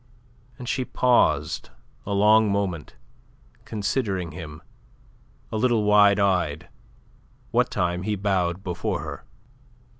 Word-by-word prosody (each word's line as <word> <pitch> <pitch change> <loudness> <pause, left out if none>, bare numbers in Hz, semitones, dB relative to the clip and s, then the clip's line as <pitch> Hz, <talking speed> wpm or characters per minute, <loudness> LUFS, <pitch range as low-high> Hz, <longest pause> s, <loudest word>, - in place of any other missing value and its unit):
And 125 - -9
she 130 - -1
paused 125 0 +1 0.4
a 100 - -1
long 105 +1 +4
moment, 95 -6 -3 0.7
considering 100 -5 -2
him, 80 -1 -9 0.9
a 110 - -2
little 115 -1 +2
wide 105 -1 +5
eyed, 90 -5 0 0.8
what - - +2
time 90 0 -1
he 105 +2 -1
bowed 95 -2 -1
before 90 -3 -3
her. - - -7
100 Hz, 110 wpm, -24 LUFS, 90-105 Hz, 0.9 s, wide